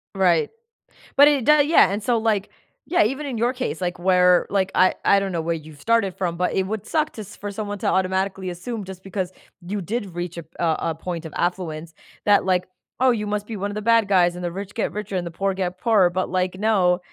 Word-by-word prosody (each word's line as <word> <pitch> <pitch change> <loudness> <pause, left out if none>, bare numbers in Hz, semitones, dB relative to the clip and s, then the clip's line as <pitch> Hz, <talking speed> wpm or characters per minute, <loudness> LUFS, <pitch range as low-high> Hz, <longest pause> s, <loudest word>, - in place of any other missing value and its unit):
Right, 180 -4 +3 0.7
but 285 +1 +9
it 280 -5 +2
doe 300 0 +6
yeah, 295 - +5
and 205 +2 -2
so 235 +2 +1
like, 220 -3 0 0.4
yeah, 340 -9 +3
even 270 +7 -2
in 260 -5 -4
your 240 +3 +1
case, 250 -6 -4
like 180 0 -2
where, 180 -1 +4
like 190 -1 0
I 185 0 +4
I 200 - +5
don't 195 -1 -3
know 165 - -1
where 170 +1 -1
you 155 -1 -10
started 195 +3 +1
from, 175 -3 -2
but 180 - 0
it 190 - +1
would 215 0 -4
suck 310 -1 0
to 220 - -7
s 210 +1 -11
for 205 0 -6
someone 205 0 -4
to - - -2
automatically 190 0 0
assume 205 +5 -5
just 190 0 -10
because 190 -2 -3 0.4
you 200 0 -3
did 200 -2 -4
reach 175 -1 -4
a 170 - -5
p 160 - -33
a 165 -2 +2 0.2
a - - -5
point 170 0 -5
of 160 - -8
affluence, 170 -3 -3 0.3
that 205 -2 +4
like, 180 -1 +1 0.3
"Oh, 260 - +5
you 210 -3 -2
must 210 0 -2
be 220 -2 -6
one 200 +1 -3
of - - -7
the 210 - -3
bad 230 -1 +3
guys 175 -3 +3
and 180 - -7
the 175 - -2
rich 200 +2 -6
get 225 - -2
richer 210 -2 -5
and 175 -1 -3
the - - -6
poor 195 +3 -1
get 185 -1 -3
poorer.", 205 -6 +4
but 185 +1 -2
like, 185 0 -1
no, 190 -4 +2
190 Hz, 250 wpm, -23 LUFS, 180-215 Hz, 0.7 s, but